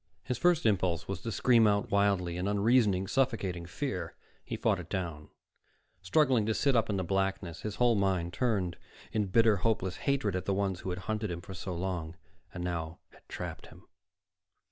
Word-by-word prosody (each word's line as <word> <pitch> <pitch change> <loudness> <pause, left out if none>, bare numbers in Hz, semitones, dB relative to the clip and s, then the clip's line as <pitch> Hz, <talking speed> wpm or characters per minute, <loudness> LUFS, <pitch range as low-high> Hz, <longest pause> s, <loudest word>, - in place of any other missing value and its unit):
His 125 - -3
first 175 -5 +3
impulse 90 -6 +1
was 95 -3 -4
to 115 - -4
scream 115 -1 +4
out 100 0 +1
wildly 100 -4 +2
in 90 +2 -2
unreasoning, 105 -2 +3
suffocating 100 -10 0
fear. 90 - -4 0.3
He - - -5
fought - - +1
it - - -9
down, 85 -5 -4 0.7
struggling 125 +5 +3
to 110 - +1
sit 140 -2 +2
up 115 -1 +2
in 100 - 0
the 95 - -1
blackness, 95 -2 -1
his 105 -2 -4
whole 120 -1 +4
mind 95 -4 0
turned 100 -9 0 0.3
in 105 -2 0
bitter, 110 +2 +4
hopeless 95 -3 0
hatred 135 -9 0
at 90 - -3
the 100 - 0
ones 95 -2 -1
who 95 - -5
had 90 - -2
hunted 110 -1 -2
him 85 -1 -4
for 95 - -9
so 95 0 -5
long, 85 -2 -3 0.4
and 90 - -6
now 85 -2 -3
had - - -22
trapped - - -6
him. - - -16
95 Hz, 190 wpm, -31 LUFS, 90-110 Hz, 0.7 s, scream